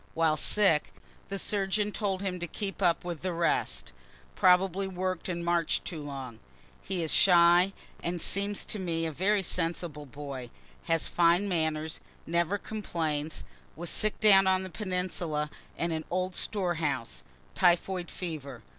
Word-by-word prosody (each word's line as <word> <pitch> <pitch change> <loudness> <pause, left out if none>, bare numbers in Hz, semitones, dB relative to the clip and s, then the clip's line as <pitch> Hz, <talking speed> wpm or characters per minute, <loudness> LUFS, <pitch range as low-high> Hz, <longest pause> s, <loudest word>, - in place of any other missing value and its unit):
While 160 -1 +3
sick, 160 0 +3 0.3
the 195 - -3
surgeon 205 +1 0
told 200 -3 -2
him 185 -2 -2
to 175 - -4
keep 200 +4 -5
up 175 -2 +2
with 170 -3 -4
the 185 -1 -2
rest 165 - 0 0.4
(probably 185 - +3
work'd 185 -1 -3
and 170 -1 -3
march'd 170 -1 +1
too 165 -4 -5
long.) 135 -5 -7 0.4
He 185 -3 -2
is 160 - -1
a - - +4
shy, 175 +1 +6 0.3
and 175 +1 -2
seems 200 +3 0
to 210 - -4
me 165 -3 -1
a 160 - -2
very 195 +6 +1
sensible 165 -4 -2
boy 135 -3 -7 0.4
has 165 -1 +1
fine 175 +3 +3
manners 160 -3 -1 0.2
never 170 +3 +1
complains 160 -8 -3 0.3
was 170 +1 -3
sick 215 0 +1
down 195 -3 +6
on 190 0 +3
the 185 - -7
peninsula 180 -5 -2 0.3
in 170 0 -1
an 160 -1 -3
old 185 0 -1
storehouse 165 - -1 0.3
typhoid 180 0 +2
fever. 145 -8 -6
175 Hz, 150 wpm, -29 LUFS, 160-190 Hz, 0.4 s, shy